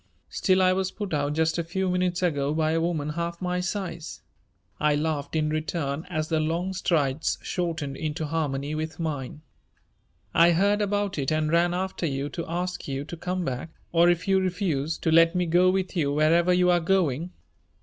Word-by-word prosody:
"Still 185 -1 +2
I 185 0 +4
was 190 0 0
put 205 -4 -5
out 145 0 0
just 160 +2 +1
a - - 0
few 190 +3 -2
minutes 180 0 0
ago 145 -4 0
by 155 -1 +1
a 165 0 +1
woman 160 -3 -1
half 170 +2 -3
my 180 -1 -1
size," 180 -3 -4 0.6
I 150 -1 +3
laughed 150 -1 -2
in 155 -1 +1
return 155 0 -2
as 155 -3 -2
the 160 -1 +1
long 170 +4 -1
strides 155 -6 0
shortened 160 -6 -3
into 155 +1 -3
harmony 145 -2 -2
with 155 +1 -4
mine. 150 -2 -4 0.9
"I 170 +1 +6
heard 200 +4 +2
about 205 -3 -1
it 135 - -1
and 155 0 +1
ran 175 +1 +3
after 185 -2 -2
you 140 0 -2
to 170 - -5
ask 180 +1 -3
you 135 0 -3
to 170 - -7
come 180 +1 -3
back 135 +4 -4 0.2
or, 170 +1 +5
if 175 +1 0
you 195 0 +4
refused, 175 -5 -1
to 160 - +2
let 165 +2 +5
me 180 0 +1
go 175 +2 +4
with 190 0 -1
you 145 -5 +1
wherever 165 +4 +3
you 180 0 +4
are 175 - +4
going. 170 -3 +1
165 Hz, 190 wpm, -26 LUFS, 155-180 Hz, 0.9 s, I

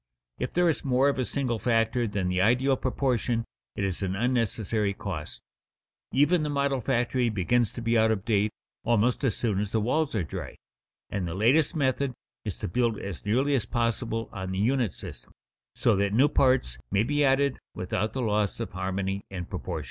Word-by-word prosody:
If - - -2
there 175 0 +4
is 160 - 0
more 135 +1 +3
of 140 - -1
a 130 - +1
single 125 -5 -1
factor 115 0 +1
than 100 -3 -2
the 90 0 +1
ideal 125 +6 +3
proportion, 125 -3 0 0.3
it - - -2
is 95 -1 -2
an 95 -1 -1
unnecessary 110 -3 0
cost. 95 -8 -6 0.7
Even 150 +5 +3
the 150 - -1
model 140 -2 0
factory 120 0 +1
begins 110 +3 +1
to 120 - -6
be 115 0 +3
out 110 0 +4
of 105 -3 -1
date 105 -2 +2 0.3
almost 120 +3 +2
as 125 -7 +1
soon 105 -5 0
as 105 0 -2
the 110 - +1
walls 135 +6 0
are 100 - +1
dry, 75 - -6 0.6
and 95 -3 -2
the 85 - -4
latest 135 - +3
method 135 -2 +1 0.3
is - - -4
to - - -4
build 115 +3 +1
as 95 -4 -6
nearly 130 +7 +2
as 120 -6 +1
possible 115 -1 -1
on 95 -2 -4
the - - -3
unit 120 +1 +2
system, - - -10 0.4
so - - +3
that 100 +1 +1
new 130 +6 +5
parts 130 - +2
may 100 +2 +3
be 145 +4 +1
added 135 0 +2 0.2
without 100 +4 -2
the 130 - -2
loss 105 -2 0
of - - -4
harmony 95 +1 -2
and 90 -2 -6
proportion. 90 -3 -4
115 Hz, 195 wpm, -27 LUFS, 100-130 Hz, 0.7 s, new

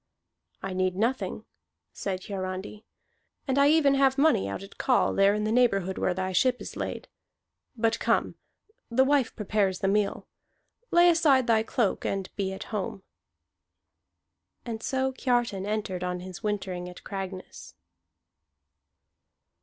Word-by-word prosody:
"I 195 -1 -3
need 185 0 0
nothing," 235 +6 -1 0.5
said 190 -2 -4
Hiarandi, 190 +2 -5 0.6
"and 270 +1 +2
I 280 - +6
even 300 -3 +4
have 270 -1 +3
money 275 - +3
out 100 - -5
at 195 - -14
call 255 - +2
there 195 +1 +4
in 210 - -1
the 215 - 0
neighborhood 195 -6 +2
where 180 - 0
thy 185 0 -2
ship 250 +7 +2
is - - -8
laid. - - -5 0.7
But 225 0 +1
come, - - +1 0.6
the 250 +3 +4
wife 275 -2 +2
prepares 205 -3 0
the 195 - -1
meal. 205 +1 0 0.6
Lay 345 +1 +6
aside 305 -7 +4
thy 225 -2 +3
cloak 220 -2 0
and 195 -1 -3
be 195 -2 -2
at 190 - -6
home." 195 -1 -3 1.6
And 225 -2 -5
so 265 0 0
Kiartan 240 -6 0
entered 205 -4 -2
on 180 0 -3
his 185 0 -9
wintering 190 -4 -3
at 180 - -12
Cragness. 190 -2 -7
210 Hz, 140 wpm, -27 LUFS, 190-255 Hz, 1.6 s, I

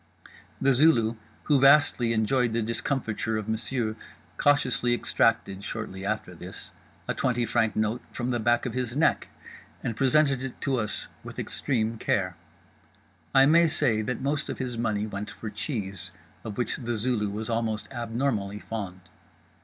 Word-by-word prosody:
The 135 0 +4
Zulu, 120 -5 +4 0.3
who 145 -3 +3
vastly 140 -4 +5
enjoyed 115 +2 +2
the 115 0 +1
discomfiture 115 -1 -1
of 110 -1 -4
Monsieur, 110 0 -1 0.4
cautiously 130 -4 +2
extracted 105 -5 +1
(shortly 100 -4 -5
after 105 -3 -2
this) 90 +2 -10 0.4
a - - 0
twenty 120 -2 0
franc 110 -2 +1
note 110 +3 0
from 125 0 -2
the 120 - 0
back 120 +2 +2
of 125 - -3
his 125 -1 -2
neck, 155 - +2 0.6
and 115 - -2
presented 135 +1 +3
it 130 -1 -6
to 135 -2 +1
us 105 -3 -2 0.2
with - - -9
extreme 115 -4 -1
care. 90 -5 0 1.0
I 135 0 +8
may 165 +3 +6
say 115 -8 +2
that 120 +4 -3
most 140 +2 -1
of - - -3
his 125 -2 -3
money 110 -3 0
went 105 0 -5
for 110 - -7
cheese, 100 - -3 0.3
of 105 -3 -6
which 120 -3 -1
The 120 -3 -3
Zulu 110 -2 0
was 105 +2 -4
almost 115 -2 -1
abnormally 115 -4 -1
fond. 100 -4 -6
115 Hz, 155 wpm, -27 LUFS, 110-130 Hz, 1.0 s, I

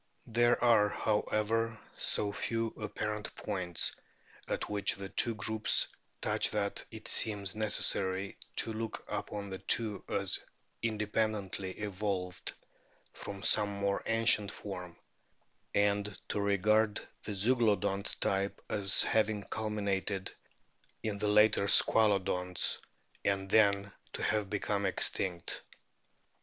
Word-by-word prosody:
There 120 +1 +2
are, 110 -4 +5
however, 110 +2 0 0.2
so 105 -1 +1
few 115 +1 -2
apparent 105 0 -5
points 90 -5 -2 0.5
at - - -3
which 105 -1 0
the 100 -1 -7
two 115 +2 +1
groups 110 0 +2 0.3
touch - - +1
that 100 -1 -2
it - - -10
seems 100 -3 +2
necessary 100 -3 0 0.2
to 115 - +1
look 110 0 -5
upon 100 -1 -5
the 95 - -5
two 105 +2 +4
as 100 -1 -1 0.4
in 110 -2 -1
dependently 105 -3 -2
evolved 100 -3 -4 0.6
from 100 -1 -7
some 105 -1 +4
more 100 0 -1
ancient 115 -2 +3
form, 90 -3 -8 0.8
and 100 0 +1
to 105 - -1
regard 105 +2 +2
the 105 - -5
Zeuglodont 100 -3 +1
type 100 0 0
as 100 -2 +6
having 110 -2 +1
culminated 100 -3 -2 0.7
in 105 -2 -3
the 105 - 0
later 105 -1 +4
Squalodonts 95 -5 +2
(see - - +2
p. - - -28
307) 100 -1 +2
and 95 0 -10
then 100 -2 +3 0.2
to - - -5
have 105 -2 0
become 100 -1 -1
extinct. 90 -2 0
105 Hz, 120 wpm, -32 LUFS, 100-110 Hz, 0.8 s, as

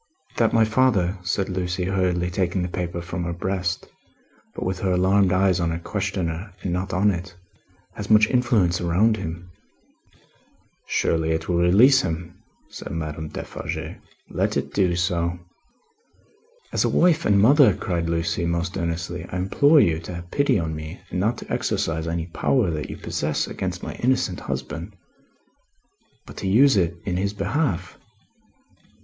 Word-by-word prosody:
"That 115 -2 +3
my 115 -1 +4
father," 110 -6 +2
said 95 +1 -1
Lucie, 90 -1 -2
hurriedly 90 -1 0
taking 90 0 0
the - - -1
paper 85 -1 -4
from 85 0 -4
her 85 - -2
breast, 90 0 -2 0.7
but - - -4
with 95 0 -2
her 95 -1 0
alarmed 95 +1 +3
eyes 95 -1 +3
on 85 -1 0
her 85 - -2
questioner 95 0 -3
and 90 - -1
not 90 +1 -2
on 100 +3 +3
it, 90 0 -6 0.6
"has - - -7
much 110 0 +7
influence 110 -9 +2
around 95 +6 +2
him." 85 +1 -6 1.4
"Surely 80 0 +1
it 80 0 -3
will 90 - +1
release 105 +11 +6
him!" 85 +1 -5 0.3
said - - -9
Madame 80 -1 -4
Defarge. - - -6 0.3
"Let - - -1
it - - -3
do 90 -3 +2
so." 85 -1 0 1.4
"As - - +2
a - - +2
wife 170 -2 +3
and 100 -1 +3
mother," 125 - +6
cried 85 -2 -2
Lucie, 85 0 -1
most 85 +2 -2
earnestly, 85 +1 -3
"I 90 - -3
implore 140 - +4
you 80 -2 +2
to 85 +1 -7
have 85 0 -9
pity 140 -4 +2
on 80 -3 -2
me 80 +3 -7
and 90 - -2
not 110 +5 +1
to - - -7
exercise 80 0 -1
any 85 0 -2
power 95 +4 +1
that 75 -1 -4
you - - -6
possess, 75 0 -2
against - - -5
my - - -5
innocent 125 -8 0
husband, 85 +7 -5 1.3
but - - -12
to - - -3
use 125 +7 +5
it 85 -3 +1
in 90 -2 -1
his 100 +2 -1
behalf. 125 - -2
90 Hz, 160 wpm, -23 LUFS, 85-100 Hz, 1.4 s, much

